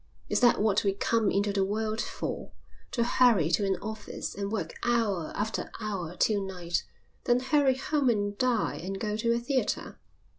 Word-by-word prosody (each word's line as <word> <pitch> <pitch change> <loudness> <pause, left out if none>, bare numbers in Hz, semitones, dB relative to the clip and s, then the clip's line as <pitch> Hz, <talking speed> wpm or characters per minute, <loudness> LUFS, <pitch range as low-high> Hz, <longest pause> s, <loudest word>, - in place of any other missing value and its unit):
Is - - +2
that 240 -1 +5
what 210 -1 +2
we 200 -1 +2
come 220 +1 +1
into 200 +1 +1
the 195 -1 +2
world 215 +3 -1
for, - - -5 0.4
to 235 - 0
hurry 235 -9 +4
to 195 +4 +2
an 190 -1 +1
office, 220 -1 -5
and 200 0 -4
work 180 -8 -3
hour 220 -9 +1
after 220 +2 -2
hour 185 -5 -4
till 205 +1 +2
night, 180 -3 -2 0.4
then 245 0 +4
hurry 265 0 +3
home 285 -1 +1
and 205 -3 0
dine 245 -1 0
and 195 +2 -5
go 210 -1 -1
to 230 +2 +1
a 235 - +3
theatre? 255 +2 -2
215 Hz, 180 wpm, -29 LUFS, 195-235 Hz, 0.4 s, that